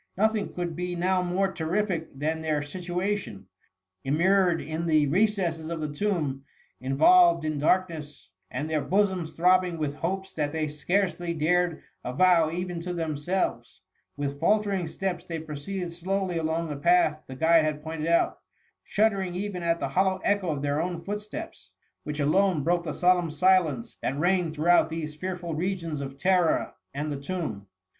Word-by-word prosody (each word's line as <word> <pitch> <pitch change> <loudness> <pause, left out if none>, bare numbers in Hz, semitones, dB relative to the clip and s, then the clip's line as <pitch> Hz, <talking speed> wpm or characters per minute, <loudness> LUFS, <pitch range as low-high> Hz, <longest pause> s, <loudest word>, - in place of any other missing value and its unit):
Nothing 215 0 +1
could 175 -2 -4
be 180 +1 -3
now 185 +1 +1
more 185 +2 0
terrific 170 -3 -2
than 160 +3 -1
their 155 -2 0
situation: 180 - -3 0.6
immured 175 +4 +3
in 160 +3 -4
the 155 -2 +4
recesses 175 -1 +1
of 170 -1 -3
the 150 -1 -3
tomb, 150 -7 -1 0.4
involved 165 +5 +5
in 155 -1 -1
darkness, 155 - 0 0.2
and 145 +5 -3
their 155 -1 0
bosoms 190 -3 +1
throbbing 180 0 +3
with 150 -3 -2
hopes 190 +5 -3
that 150 -2 -1
they 160 -1 -1
scarcely 175 +3 -1
dared 170 +1 +1 0.2
avow 165 +5 +3
even 175 +1 -3
to 180 +1 -4
themselves; 165 +3 -2 0.4
with 140 0 -3
faltering 200 -3 +1
steps 180 +1 -3
they 165 - -5
proceeded 160 +4 -5
slowly 185 0 -1
along 165 +1 -1
the 145 - -4
path 155 -1 +3
the 130 - -8
guide 160 +3 +4
had 150 -1 -2
pointed 160 0 -4
out, 170 0 +2 0.4
shuddering 195 -4 +1
even 190 -1 -3
at 170 0 +1
the 140 - -2
hollow 190 +5 +1
echo 200 -3 +1
of 145 -2 -2
their 145 +1 0
own 175 -1 -3
footsteps, 210 +11 -7 0.3
which 150 0 -4
alone 160 +2 +2
broke 175 +2 +2
the 170 - -4
solemn 180 -2 +3
silence 155 -6 +2
that 135 - -2
reign - - -4
THE 165 - +1
MUMMY. 185 0 +3
Sll 170 - -2
ed 155 - -8
throughout 165 +1 +4
these 160 -2 -4
fearful 175 0 -4
regions 165 -3 -2
of 135 0 -6
terror 180 +1 +2 0.2
and 150 +2 -3
the 140 -1 -4
tomb. 140 - -4
170 Hz, 165 wpm, -27 LUFS, 155-185 Hz, 0.6 s, involved